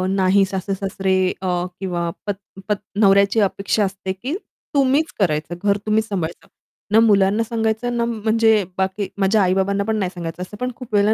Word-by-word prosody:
नाही 195 +1 +4
सासू-सासरे 190 0 -1 0.2
अ, 190 - -3 0.3
किंवा 175 -3 -2 0.2
पत 205 -1 -1 0.3
पत 210 - +2 0.2
नवऱ्याची 200 +1 +5
अपेक्षा 200 +1 0
असते 190 0 -4
की, 255 - -4 0.4
तुम्हीच 280 +3 +3
करायचं, 155 -3 0
घर 200 0 +3
तुम्हीच 215 +1 +1
सांभाळायचं. 170 -5 -4 0.4
ना 220 - +6
मुलांना 205 -1 +4
सांगायचं, 225 +1 -1
ना 235 - +1
म्हणजे 220 -1 +2
बाकी 190 +1 -1
माझ्या 200 +2 +3
आई-बाबांना 190 +2 +1
पण 220 +1 -1
नाही 190 -4 0
सांगायचं. 170 0 -6
असं 210 +3 -10
पण 250 +3 -2
खूप 250 -4 -11
वेळेला 205 +1 +4
200 Hz, 160 wpm, -21 LUFS, 190-220 Hz, 0.4 s, ना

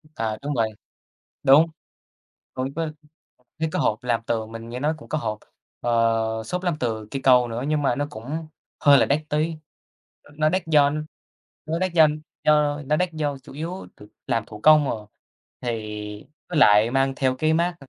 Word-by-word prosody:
À, 110 -1 -2
đúng 145 +1 -3
vậy, 115 -2 +1 0.7
đúng. 140 +4 +7 0.9
Cũng 130 +2 -3
có 165 0 -2 0.7
thấy 160 - +1
có - - -1
hộp 110 +3 0
làm 120 -2 0
tường, 110 -1 -2
mình 115 0 -8
nghe 120 +2 -6
nói 150 +3 +1
cũng - - -14
có 155 - -1
hộp, 110 -6 -3 0.4
ờ, 115 -1 +1
xốp 180 +11 -3
làm 175 -3 0
từ 110 -3 -2
cây 135 - -3
cau 125 -2 +5
nữa 115 +3 -4
nhưng 150 -1 +1
mà 135 - +2
nó 145 - -1
cũng 150 +8 -6 0.3
hơi 140 -1 +7
là - - +3
đắt 145 +2 +2
tí, 155 +2 0 0.7
ơ, 145 - -19
nó 155 0 +3
đắt 185 +1 -1
do 145 -3 +5 0.8
nó 160 +1 -1
đắt 185 -1 0
do 160 -2 +7 0.4
do 150 -1 +3
nó 150 +1 +2
đắt 180 0 0
do 145 -3 -2
chủ - - -14
yếu 165 +6 -6
th - - -16 0.2
làm 115 - 0
thủ 105 -1 -11
công, 155 -2 +6
ờ, 105 -2 -5 0.5
thì 120 - -2 0.8
với 170 -4 -1
lại 105 -2 +6
mang 135 +1 +1
theo 130 -1 +1
cái 155 +3 +1
mác, 170 +2 +1
140 Hz, 190 wpm, -24 LUFS, 115-155 Hz, 0.9 s, đúng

